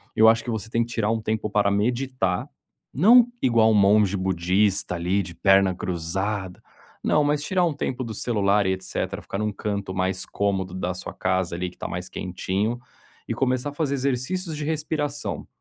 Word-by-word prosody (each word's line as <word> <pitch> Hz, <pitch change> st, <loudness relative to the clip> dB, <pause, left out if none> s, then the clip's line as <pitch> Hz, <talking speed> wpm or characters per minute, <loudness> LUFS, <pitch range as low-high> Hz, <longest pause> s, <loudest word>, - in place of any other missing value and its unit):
eu 110 Hz, -, +6 dB
acho 110 Hz, 0 st, +5 dB
que 120 Hz, -, -6 dB
você 110 Hz, -1 st, -3 dB
tem 115 Hz, 0 st, +1 dB
que 120 Hz, -, -9 dB
tirar 110 Hz, -1 st, +1 dB
um 115 Hz, -1 st, -1 dB
tempo 110 Hz, 0 st, -1 dB
para 100 Hz, -1 st, +2 dB
meditar, 120 Hz, -2 st, 0 dB, 0.5 s
não 230 Hz, -, +7 dB
igual 115 Hz, -3 st, +4 dB
um -, -, +3 dB
monge 100 Hz, -1 st, +4 dB
budista 95 Hz, +1 st, +1 dB
ali, 90 Hz, +4 st, 0 dB
de 85 Hz, -2 st, -8 dB
perna 95 Hz, 0 st, +4 dB
cruzada. 95 Hz, +2 st, -3 dB, 0.4 s
Não, 150 Hz, 0 st, +3 dB
tirar 180 Hz, +5 st, 0 dB
um 165 Hz, -, 0 dB
tempo 130 Hz, -2 st, -3 dB
do 115 Hz, -, -5 dB
celular 105 Hz, -3 st, +1 dB
e 95 Hz, -, +2 dB
etcétera, 95 Hz, 0 st, -4 dB
ficar 100 Hz, -, -5 dB
em 105 Hz, -, -1 dB
um 105 Hz, -1 st, -1 dB
canto 100 Hz, -2 st, -3 dB
mais 95 Hz, 0 st, -1 dB
cômodo 95 Hz, -2 st, -1 dB
da 90 Hz, -1 st, -2 dB
sua 95 Hz, -, -7 dB
casa 95 Hz, -2 st, -1 dB
ali, 90 Hz, +1 st, -3 dB
que -, -, -19 dB
está -, -, -5 dB
mais 90 Hz, +1 st, -5 dB
quentinho, 95 Hz, +6 st, -2 dB, 0.5 s
e -, -, -1 dB
começar 130 Hz, +1 st, 0 dB
a -, -, -10 dB
fazer 145 Hz, -2 st, -1 dB
exercícios 140 Hz, +6 st, -2 dB
de 150 Hz, -, -4 dB
respiração. 150 Hz, -2 st, -3 dB
105 Hz, 190 wpm, -24 LUFS, 95-130 Hz, 0.5 s, não